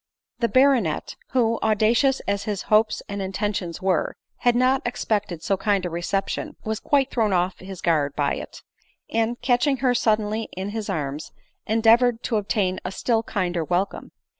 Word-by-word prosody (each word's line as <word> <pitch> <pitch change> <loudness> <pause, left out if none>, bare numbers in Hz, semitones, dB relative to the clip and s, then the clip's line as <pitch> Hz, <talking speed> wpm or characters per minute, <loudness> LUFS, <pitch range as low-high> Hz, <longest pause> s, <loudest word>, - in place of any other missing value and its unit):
The 235 - +2
baronet, 255 - +2 0.2
who, 230 -3 +2
audacious 225 +5 +3
as 200 0 -2
his 205 -3 -3
hopes 215 +1 +3
and 200 -1 -4
inten 195 +2 -2
tions 175 -2 -5
were, 185 -4 +1 0.2
had 245 -1 +2
not 255 +2 +3
expected 210 -7 -2
so 195 - +1
kind 200 -2 +1
a 175 - -3
reception, 180 +3 -2
was 220 0 -2
quite 275 -2 +1
thrown 220 -4 +1
off 180 +1 0
his 190 -1 -9
guard 150 -4 +1
by 145 -1 +1
it; - - -9 0.5
and, 230 +1 0
catching 260 +3 +2
her 250 0 +2
sud 220 -3 +3
denly 215 +1 -3
in 190 +2 -4
his 215 0 -4
arms, 150 -4 -3 0.4
endeavored 230 +2 +4
t6 225 -3 +1
obtain 195 -2 -1
a 185 - -4
still 225 +3 0
kinder 180 -6 -2
welcome. 180 +5 -2
210 Hz, 170 wpm, -24 LUFS, 185-235 Hz, 0.5 s, endeavored